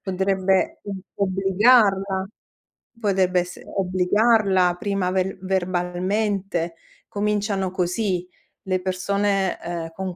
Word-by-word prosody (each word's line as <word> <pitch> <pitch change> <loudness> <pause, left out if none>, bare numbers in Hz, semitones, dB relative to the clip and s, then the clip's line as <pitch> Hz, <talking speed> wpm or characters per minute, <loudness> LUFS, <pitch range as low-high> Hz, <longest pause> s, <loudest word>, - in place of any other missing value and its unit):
potrebbe 190 0 0
o 200 - -4 0.3
obbligarla, 195 0 +3 0.7
potrebbe 190 -4 +2
esse 180 0 -6
obbligarla 190 0 +2
prima 195 -2 -1
ver 190 0 -1
verbalmente. 185 0 -1 0.3
Cominciano 205 -2 -1
così 180 0 -1 0.4
le 185 -1 0
persone, 195 +1 0
ehm, 170 -1 -5
con 190 -1 -5
190 Hz, 90 wpm, -23 LUFS, 180-200 Hz, 0.7 s, obbligarla